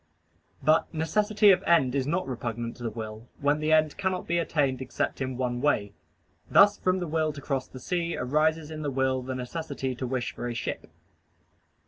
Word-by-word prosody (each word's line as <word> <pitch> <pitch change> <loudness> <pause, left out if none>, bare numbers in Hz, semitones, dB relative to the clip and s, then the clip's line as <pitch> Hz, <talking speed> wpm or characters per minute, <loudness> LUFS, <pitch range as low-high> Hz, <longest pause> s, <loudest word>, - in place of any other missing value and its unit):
But 155 +3 +3
necessity 205 +6 +3
of 185 - +3
end 135 -7 +3
is 135 -1 0
not 170 +2 0
repugnant 115 -2 -4
to - - -14
the 115 - -2
will, 110 +1 -7
when 145 +2 +2
the 155 +1 0
end 155 -1 +3
cannot 190 -1 -1
be 170 +1 +1
attained 140 -6 0
except 130 +1 -3
in 130 -1 -2
one 125 -1 -1
way: 105 -9 +1 0.6
thus 205 +1 +7
from 185 0 +1
the 175 -2 -3
will 155 0 0
to 145 - -8
cross 135 -2 -2
the 130 - -11
sea, 170 +4 -2
arises 155 +3 +1
in 155 -1 -6
the 145 - -1
will 130 -1 0
the 130 +1 -4
necessity 135 +1 -4
to 125 +1 -4
wish 125 -1 -2
for 120 - -5
a 120 - -4
ship. - - -4
140 Hz, 195 wpm, -27 LUFS, 125-160 Hz, 0.6 s, thus